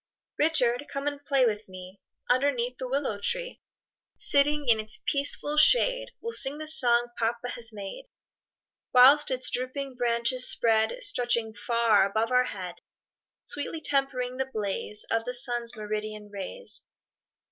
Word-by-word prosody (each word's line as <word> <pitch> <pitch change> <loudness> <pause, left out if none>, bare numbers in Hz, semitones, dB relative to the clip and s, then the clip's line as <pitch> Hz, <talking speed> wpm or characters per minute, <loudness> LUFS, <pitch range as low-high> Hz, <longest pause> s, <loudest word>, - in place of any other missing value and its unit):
Richard, 290 -4 +2
come 275 0 -5
and 290 -1 -4
play 275 -3 +2
with 215 -3 -2
me, 185 +1 -12 0.3
Underneath 250 -1 0
the 255 - -4
willow 265 -6 -2
tree; - - -2 0.6
Sitting 290 0 +2
in 225 -2 +4
its 215 0 -3
peaceful 290 +1 +1
shade, - - +4
We'll 465 - -5
sing 280 -9 0
the 310 - -7
song 240 -5 +3
papa 235 +2 -2
has 230 -2 -7
made, 205 - -8 0.9
Whilst 275 +4 +7
its 255 -1 -2
drooping 255 +2 -1
branches 240 +1 +2
spread, 225 - +2
Stretching 240 - +1
far 230 0 +2
above 220 +4 -1
our 250 0 +3
head, 180 -6 -7 0.6
Sweetly 290 +2 -4
tempering 265 -3 -2
the 265 0 -3
blaze 210 -1 -4
Of 225 0 0
the 250 0 -4
sun's 240 -2 -1
meridian 215 0 -6
rays. 335 - -7
250 Hz, 140 wpm, -27 LUFS, 225-280 Hz, 0.9 s, Whilst